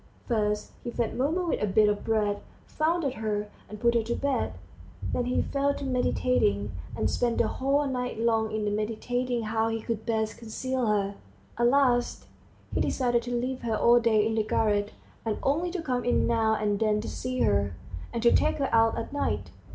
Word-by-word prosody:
First 210 -3 0
he 240 - -4
fed 235 -1 -2
Mumu 315 +8 0
with - - 0
a 210 - +1
bit 210 +2 +4
of 205 0 0
bread, 210 -2 0 0.2
fondled 310 -3 0
her, 210 -2 -3 0.2
and 210 - -8
put 235 +1 +3
her 235 - +3
to 235 +2 -2
bed, 280 -1 -1 0.6
then 245 - 0
he 250 - +1
fell 280 0 0
to 280 - -5
meditating, 250 - +1 0.3
and 110 - +1
spent 240 - 0
the - - +3
whole 280 +2 +1
night 250 -4 -3
long 225 -1 +1
in 210 -1 -1
meditating 240 +3 -1
how 220 +1 0
he 225 0 -1
could 220 -1 -3
best 220 -1 -1
conceal 250 +2 -2
her. 200 -1 +1 0.4
At 240 0 +3
last 245 -2 +2 0.5
he - - +1
decided 245 -2 +1
to 245 0 -3
leave 255 +1 -3
her 225 -2 -1
all 240 +2 +5
day 220 -3 +3
in 225 - 0
the 220 -1 +1
garret, 210 -1 +1 0.3
and 220 -2 -1
only 315 +6 +1
to 355 -1 -4
come 250 -4 -1
in 245 - +2
now 225 -2 +2
and 210 -1 0
then 215 -1 +2
to - - -6
see 255 0 -3
her, 100 -3 +2 0.4
and 235 - -3
to 235 - +6
take - - +3
her 275 -2 -1
out 225 0 +4
at 230 - -5
night. 285 - -2
230 Hz, 200 wpm, -28 LUFS, 215-250 Hz, 0.6 s, to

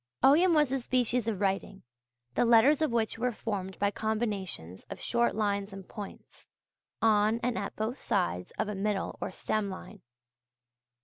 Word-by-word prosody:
Ogham 330 +6 +6
was 295 -4 +3
a 270 - +1
species 245 -1 0
of 210 -3 -2
writing, 195 0 -1 0.5
the - - +2
letters 240 +6 +5
of 310 - +2
which 225 -1 0
were 250 +1 +1
formed 195 -4 -4
by 200 0 +1
combinations 205 - -3
of - - -7
short 235 0 +1
lines 200 -2 -1
and 195 -1 -9
points, 205 -2 -10 0.6
on 215 +1 +4
and 245 0 0
at 200 +1 -4
both 220 +5 -3
sides 180 - -1
of - - 0
a 210 - -3
middle 200 0 -2
or - - -2
stem 205 +2 -2
line. 190 +1 -9
215 Hz, 165 wpm, -30 LUFS, 195-240 Hz, 0.6 s, Ogham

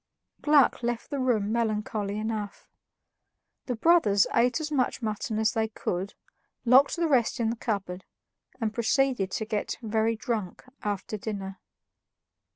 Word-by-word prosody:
Gluck 295 -4 +4
left 240 +2 -3
the 285 - -2
room 225 -5 +1
melancholy 215 -2 -1
enough. 215 -2 -4 1.0
The 250 - -1
brothers 220 - +4
ate 245 +5 +3
as 305 -1 -4
much 260 -3 0
mutton 215 +1 -2
as 220 -1 +2
they 220 0 +1
could, 195 -2 -4 0.5
locked 260 +4 +6
the 340 -1 +1
rest 260 -4 +2
in 225 -1 +1
the - - -3
cupboard, 195 -5 -3 0.6
and 220 -3 -1
proceeded 240 -3 +1
to 220 - -3
get 215 -1 -2
very 220 +1 +1
drunk 220 -6 -4 0.2
after 205 +1 -3
dinner. 195 -2 -5
220 Hz, 140 wpm, -27 LUFS, 210-250 Hz, 1.0 s, locked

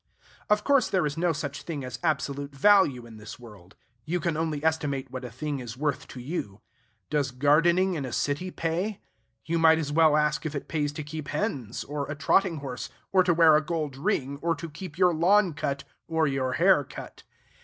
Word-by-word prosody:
Of 210 0 +3
course 280 -2 +3
there 185 -4 +1
is 145 -1 -2
no 170 +1 +1
such 145 -1 -4
thing 145 -6 -5
as 125 -2 -6
absolute 140 -3 -2
value 140 -7 +4
in 115 -2 -12
this 105 0 -9
world. 105 -6 -15 0.3
You 175 +8 -1
can 165 -1 -1
only 155 -2 -2
estimate 140 -5 -1
what 130 0 -6
a 125 - -5
thing 140 +4 -4
is 120 -1 -7
worth 145 -1 -2
to 130 - -9
you. 120 - -5 0.5
Does 145 -2 +1
gardening 165 +8 +3
in 155 -5 -3
a 130 - -5
city 145 +9 -1
pay? 180 +5 -2 0.5
You 165 0 0
might 160 0 +6
as 150 -3 -2
well 155 0 +5
ask 150 +1 +1
if 155 -2 -4
it 140 - -5
pays 150 -2 -1
to 155 - -5
keep 150 0 -7
hens, 130 -6 -3
or 145 -1 -4
a 150 - -3
trotting 170 +3 +2
horse, 125 -1 -5 0.2
or 185 -1 +5
to 180 -1 +3
wear 160 -2 +7
a 155 - +4
gold 155 -4 -3
ring, 140 -4 -1
or 165 0 +1
to 165 +1 -8
keep 165 +1 -9
your 180 -2 +4
lawn 180 +3 +3
cut, 140 -1 -3 0.2
or 160 -1 +1
your 135 -2 -1
hair 180 -3 +4
cut. - - -10
150 Hz, 210 wpm, -27 LUFS, 140-170 Hz, 0.5 s, wear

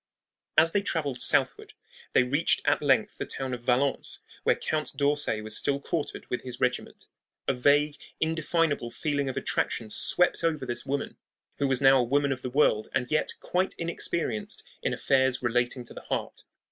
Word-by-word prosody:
As 165 +1 +6
they 205 - +2
traveled 145 -9 -1
southward - - +2 0.4
they - - +5
reached 140 +6 +2
at - - +2
length 135 -7 +2
the - - -2
town 130 -1 -4
of 125 - -5
Valence, 130 +3 0 0.2
where - - +3
Count 155 -3 -3
d'Orsay 145 -6 +1
was 110 0 -2
still 140 0 +1
quartered 150 +2 -4
with 125 - -3
his 125 -2 -8
regiment. 125 -1 -2 0.4
A - - +3
vague, 145 +3 +3 0.2
indefinable 160 -4 0
feeling 145 +1 -2
of 130 - -5
attraction 110 -2 -1
swept 180 +10 +1
over 155 -5 0
this 120 +1 -5
woman, 140 +1 -3 0.4
who 140 - +2
was 135 -1 +2
now 135 0 +6
a - - +3
woman 140 +3 +1
of 130 -1 -3
the 130 - -4
world 125 -5 +2
and 125 -2 -1
yet 155 - +1
quite 185 +1 0
inexperienced 165 -8 -1 0.2
in - - -1
affairs 130 -1 +1
relating 120 +1 0
to 120 - -9
the - - -9
heart. - - -4
135 Hz, 175 wpm, -27 LUFS, 125-150 Hz, 0.4 s, As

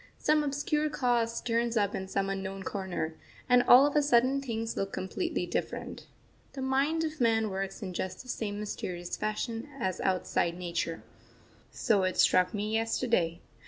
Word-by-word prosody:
Some 305 0 +3
obscure 295 +2 0
cause 240 -4 0
turns 235 0 0
up 205 -1 +1
in 190 - -4
some 195 0 -1
unknown 195 0 -4
corner, 185 -5 -3 0.3
and 250 0 +6
all 250 +3 +8
of 290 - 0
a 295 - +5
sudden 265 0 +3
things 225 -3 -3
look 195 0 -2
completely 335 - -2
different. - - -4 0.5
The 265 - -5
mind 280 +5 +1
of 310 -3 -4
man 225 -2 +2
works 195 +1 -4
in 185 -2 -5
just 185 +5 -4
the - - -17
same 210 -4 -3
mysterious 175 -4 -4
fashion 225 +4 -3
as 190 -5 -2
outside 175 -2 0
Nature 170 -2 -3 0.7
so 215 -5 +1
it 185 0 0
struck 180 0 +4
me 210 0 -3
yesterday. 225 -6 0
225 Hz, 160 wpm, -30 LUFS, 190-255 Hz, 0.7 s, all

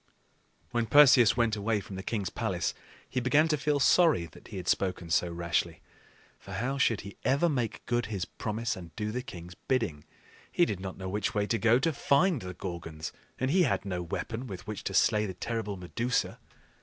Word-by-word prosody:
When 120 -1 0
Perseus 125 -5 +7
went 115 -2 +2
away 105 +1 0
from 100 -1 -9
the 95 - -5
king's 100 -2 -2
palace, - - -1 0.3
he - - -2
began 145 +6 +3
to 155 - +3
feel 150 0 0
sorry 155 - +4
that 80 - -15
he 105 - -8
had 90 -2 -6
spoken 90 -3 0
so 85 +2 +2
rashly. 85 0 -1 0.6
For - - -10
how 135 +4 -2
should 115 -5 +2
he 100 +1 -10
ever 140 +6 +3
make 125 -8 -2
good 120 0 0
his 100 -5 -3
promise 110 +4 -3
and 85 -3 -11
do 105 -1 -2
the 125 +3 -2
king's 90 -6 -9
bidding? 95 - -2 0.5
He 175 - +4
did 100 - -3
not 95 -1 -6
know 95 - -6
which 105 +3 -2
way 105 -1 +2
to 115 - 0
go 115 +3 +5
to 160 +5 +1
find 145 +2 +2
the 90 -1 -7
Gorgons, 80 -4 -6 0.3
and 130 +1 0
he 185 +3 +4
had 135 - +1
no 90 -2 -2
weapon 115 +8 -4
with 95 -5 -8
which 105 -1 -6
to 95 - -2
slay 105 +1 +3
the 95 - -6
terrible 105 +1 -3
Medusa. 115 +7 -1
110 Hz, 205 wpm, -29 LUFS, 95-125 Hz, 0.6 s, Perseus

